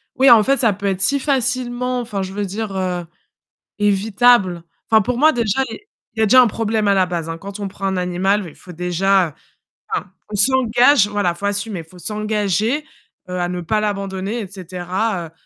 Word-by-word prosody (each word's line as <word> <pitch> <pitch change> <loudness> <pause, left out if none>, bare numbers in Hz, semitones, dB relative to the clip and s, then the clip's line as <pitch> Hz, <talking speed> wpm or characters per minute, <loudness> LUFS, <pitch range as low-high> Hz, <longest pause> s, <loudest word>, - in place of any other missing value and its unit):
oui, 265 +1 +5
en 225 -3 +8
fait, 275 +3 +2
ça 225 -5 +2
peut 200 +1 -8
être 190 -1 -1
si 280 +8 +2
facilement 250 -2 -1
enfin, 210 -4 -4
je 190 0 -5
veux 205 0 -2
dire, 205 +1 -5
heu, 180 -2 -2 0.7
évitable. 205 -3 +3 0.3
Enfin, 220 -1 +5
pour 250 +4 -2
moi 310 +2 +5
déjà 235 +1 0
les 415 - -10 0.3
il - - -11
y - - +2
a - - +2
déjà 255 +4 +7
un 240 - +3
problème 220 -1 -1
à 200 - +5
la 185 -1 +3
base, 170 -2 -4
hein, 165 - -5
quand 200 +3 -8
on 200 - -3
prend 195 +1 -5
un 190 -1 -1
animal, 185 +3 0
il - - -14
faut 180 - -12
déjà, 180 +2 +1
heu - - -13 0.6
enfin, - - -3 0.2
on 210 - -3
s'engage 245 +1 +4
voilà, 205 -3 0
il 170 - -6
faut 200 - -3
assumer, 200 -1 -2
il 165 - -10
faut 180 +1 -16
s'engager, 215 - -1 0.5
heu, 180 - -3
à 175 - 0
ne 180 -1 -4
pas 215 +6 0
l'abandonner 200 +1 -3
et 205 - -5
cetera, 185 0 -3
heu. - - -21
205 Hz, 215 wpm, -19 LUFS, 185-230 Hz, 0.7 s, en